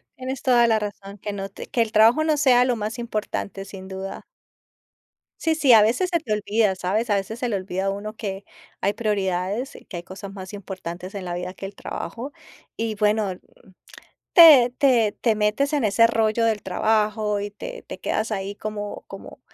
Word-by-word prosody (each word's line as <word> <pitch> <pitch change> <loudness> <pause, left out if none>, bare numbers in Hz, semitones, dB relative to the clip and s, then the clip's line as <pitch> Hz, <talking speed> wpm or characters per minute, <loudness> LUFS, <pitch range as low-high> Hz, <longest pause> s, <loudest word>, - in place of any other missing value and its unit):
Tienes 260 0 -5
toda 240 -2 +4
la 220 -1 +3
razón, 200 -1 -7
que 205 +1 -5
no 195 -1 -5
te - - -9
que 235 - 0
el 220 -1 0
trabajo 225 +7 +5
no 310 -2 +2
sea 250 -3 +5
lo 250 - +1
más 215 +2 -4
importante, 215 -4 -4
sin 190 -1 -10
duda. 190 0 -6 1.1
Sí, 320 - +1
sí, 290 -5 +3
a 215 - +8
veces 245 - +1
se 340 - +2
te 225 -8 -3
olvida, 210 -1 +1
¿sabes? 210 +5 -1
A 205 - +4
veces 200 +4 -3
se 250 - -2
le 220 - -1
olvida 190 0 -3
a - - +1
uno 210 +2 -5
que 195 -2 -5 0.4
hay 200 +2 +1
prioridades, 205 +2 -2
que 180 - -7
hay 170 - -6
cosas 195 +1 -9
más 190 -1 -8
importantes 185 -2 -7
en 195 -2 -6
la 175 -1 -3
vida 180 +1 -5
que 195 - -7
el 200 - -12
trabajo, 250 +7 -6 0.4
y 225 -1 -2
bueno, 210 -1 +1 1.0
te 295 -8 +9
te 240 -6 +3
te 225 -3 +2
metes 215 +8 +1
en 285 -6 +1
ese 215 +3 +5
rollo 225 0 +1
del 220 -2 +1
trabajo 210 +1 0
y 205 - -4
te - - -8
te - - -8
quedas 220 +1 -2
ahí 195 0 -3
como 210 -1 -6
como - - -11
210 Hz, 195 wpm, -23 LUFS, 195-235 Hz, 1.1 s, te